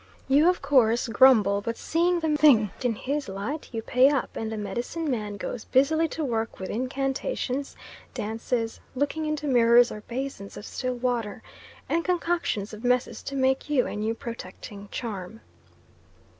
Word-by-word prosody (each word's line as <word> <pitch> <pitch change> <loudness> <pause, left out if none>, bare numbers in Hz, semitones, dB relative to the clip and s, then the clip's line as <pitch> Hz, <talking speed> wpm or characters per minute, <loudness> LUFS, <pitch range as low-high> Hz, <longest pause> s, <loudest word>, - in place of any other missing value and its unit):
You 290 +5 +5
of 360 - -1
course 250 -4 +3
grumble, 220 -3 +5
but 230 +2 -4
seeing 345 +1 +1
the 315 -2 +1
thing 250 -10 +5
in 245 -3 0
his 280 +2 -3
light 210 +11 -5
you 225 -2 -4
pay 255 +4 +5
up, 280 -4 -1
and 225 0 -3
the 220 - -4
medicine 240 +11 -3
man 210 -4 -3
goes 220 +2 -5
busily 315 +5 +3
to 315 0 -3
work 225 -3 -2
with 190 - -5
incantations, 270 - -2 0.4
dances, 225 +2 -2 0.2
looking 290 +3 -1
into 305 -1 -2
mirrors 240 -2 +5
or 210 - -7
basins 240 -3 -6
of 205 - -8
still 255 -1 -3
water, 240 -4 -2 0.4
and 335 +1 0
concoctions 340 - -1
of 215 +2 -9
messes 250 0 +1
to 275 - -6
make 265 +1 +1
you 280 -4 +3
a - - -5
new 215 +2 -1
protecting 205 -3 -8
charm. 215 -2 -6
250 Hz, 160 wpm, -26 LUFS, 220-285 Hz, 0.4 s, You